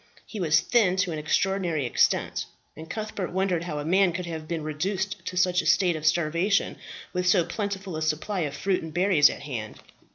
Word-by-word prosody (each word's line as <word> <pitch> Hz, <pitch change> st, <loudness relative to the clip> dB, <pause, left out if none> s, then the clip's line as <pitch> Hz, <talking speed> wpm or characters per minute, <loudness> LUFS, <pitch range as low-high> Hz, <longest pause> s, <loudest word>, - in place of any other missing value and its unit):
He 215 Hz, -, -8 dB
was 160 Hz, -3 st, +3 dB
thin 210 Hz, -7 st, +3 dB
to 185 Hz, -1 st, 0 dB
an 155 Hz, -, -3 dB
extraordinary 170 Hz, -1 st, 0 dB
extent, 120 Hz, -, +1 dB, 0.3 s
and 160 Hz, +1 st, -10 dB
Cuthbert 215 Hz, -4 st, -4 dB
wondered 185 Hz, -2 st, 0 dB
how 155 Hz, -4 st, -4 dB
a 145 Hz, -, -4 dB
man 185 Hz, +1 st, +3 dB
could 180 Hz, +1 st, -4 dB
have 160 Hz, -2 st, -6 dB
been 165 Hz, -2 st, -3 dB
reduced 190 Hz, +5 st, -3 dB
to 180 Hz, -, -4 dB
such 180 Hz, 0 st, +3 dB
a -, -, -5 dB
state 180 Hz, -4 st, +3 dB
of 155 Hz, 0 st, -2 dB
starvation, 170 Hz, +5 st, +1 dB, 0.4 s
with 180 Hz, 0 st, -1 dB
so 180 Hz, -2 st, +4 dB
plentiful 200 Hz, -4 st, -4 dB
a 155 Hz, -, -4 dB
supply 160 Hz, +6 st, -1 dB
of 145 Hz, -4 st, -2 dB
fruit 190 Hz, +2 st, 0 dB
and 160 Hz, -, -7 dB
berries 175 Hz, -3 st, +4 dB
at -, -, -7 dB
hand. 115 Hz, -7 st, -6 dB
175 Hz, 200 wpm, -26 LUFS, 155-190 Hz, 0.4 s, so